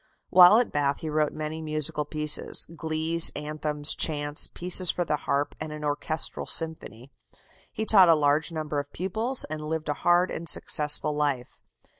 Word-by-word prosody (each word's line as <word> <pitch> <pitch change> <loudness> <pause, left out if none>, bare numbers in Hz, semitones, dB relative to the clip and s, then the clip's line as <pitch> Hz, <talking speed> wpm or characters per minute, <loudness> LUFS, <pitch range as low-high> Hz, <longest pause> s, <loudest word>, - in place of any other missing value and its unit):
While 185 +3 +7
at 245 - 0
Bath 140 -1 -1
he 155 - -5
wrote 150 0 0
many 155 +1 -6
musical 155 -1 -4
pieces 150 0 0
glees, 160 +1 +3
anthems, 150 0 -2
chants, 145 -1 +1
pieces 180 0 +2
for 175 - -2
the 150 - -1
harp, 145 0 -3
and 155 0 -7
an 150 0 -9
orchestral 150 +2 -4
symphony. 140 -6 -1 0.6
He 220 - -5
taught 190 -5 +5
a 165 - +6
large 150 +2 +1
number 155 -2 -4
of 145 0 -8
pupils, 220 +8 0
and 150 0 -7
lived 160 -1 -4
a - - 0
hard 175 +1 +2
and 165 0 -4
successful 150 0 +2
life. 145 -4 -3
155 Hz, 165 wpm, -25 LUFS, 150-165 Hz, 0.6 s, While